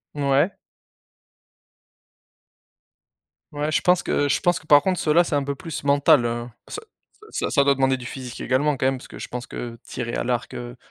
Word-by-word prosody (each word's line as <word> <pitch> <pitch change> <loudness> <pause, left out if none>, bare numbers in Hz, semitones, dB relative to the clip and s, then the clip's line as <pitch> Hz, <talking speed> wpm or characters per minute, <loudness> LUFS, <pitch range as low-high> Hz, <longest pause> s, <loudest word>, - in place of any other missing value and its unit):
Mouais. 140 +5 +2 3.0
Ouais 150 +1 -2
je - - +2
pense 180 0 +3
que 145 - 0
je - - +1
pense 175 -1 +1
que 160 - -20
par 145 -2 +7
contre 185 +4 0
ceux 150 - +1
là, 175 - +6
c'est 165 -3 -2
un 140 - +1
peu 140 +1 -2
plus 165 +2 -7
mental, 140 -3 +4
heu, 120 0 -2 0.2
ça 425 - -6 0.5
ça - - -2
ça 140 - +4
doit 140 0 +3
demander 135 0 +2
du 120 - -10
physique 125 -1 -7
également 140 +3 +1
quand - - -1
même 135 0 0
parce - - -12
que - - -11
je - - -6
pense 125 0 -6
que 120 -1 -7
tirer 120 -2 -5
à - - -1
l'arc, 120 -1 -2
heu, 120 0 -7
140 Hz, 205 wpm, -23 LUFS, 125-150 Hz, 3.0 s, par